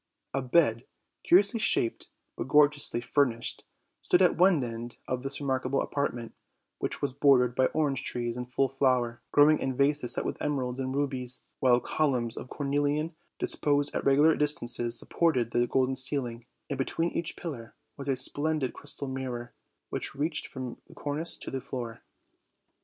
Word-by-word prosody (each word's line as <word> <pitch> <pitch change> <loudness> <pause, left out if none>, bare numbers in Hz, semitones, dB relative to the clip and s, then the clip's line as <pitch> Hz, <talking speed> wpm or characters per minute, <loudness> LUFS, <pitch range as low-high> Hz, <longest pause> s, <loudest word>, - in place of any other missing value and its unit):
A 135 - 0
bed, 125 -3 +2 0.3
curiously 200 +5 +4
shaped, 120 - +1 0.3
but - - -5
gorgeously 145 -3 +3
furnished, 125 -3 0 0.4
stood 180 +1 +3
at 180 - +4
one 180 -5 +4
end 115 0 -6
of 125 -1 -2
this 135 +1 -2
remarkable 130 -1 -1
apartment, 120 -5 -3 0.5
which - - -3
was 140 -3 0
bordered 130 -3 +4
by 130 +1 +3
orange 140 -4 0
trees 120 -1 -2
in 125 0 -5
full 135 +2 +1
flower, 125 -3 0
growing 150 +1 +5
in 130 -1 -2
vases 140 -3 +2
set - - -2
with - - -4
emeralds 130 -3 -2
and 130 0 -3
rubies, 130 -3 -2 0.2
"while 125 -2 +4
columns 125 -6 0
of 125 - -8
cornelian, 145 +3 -1 0.2
disposed 145 0 +2
at - - -1
regular 145 +4 +5
distances, 120 -5 +2
supported 125 -9 +1
the 120 0 +2
golden 130 +1 +1
ceiling, 125 -3 -1 0.2
and 140 -2 -4
between 165 +5 -1
each 170 0 -2
pillar 130 -10 -7 0.2
was 140 -1 -8
a 135 - +1
splendid 145 +1 0
crystal 145 -1 -5
mirror, 125 -2 -5 0.4
which - - -2
reached 150 +3 -1
from 130 -3 -7
the - - -16
cornice 150 +3 -2
to - - -7
the 135 - -3
floor. 120 -3 -6
135 Hz, 160 wpm, -28 LUFS, 125-145 Hz, 0.5 s, growing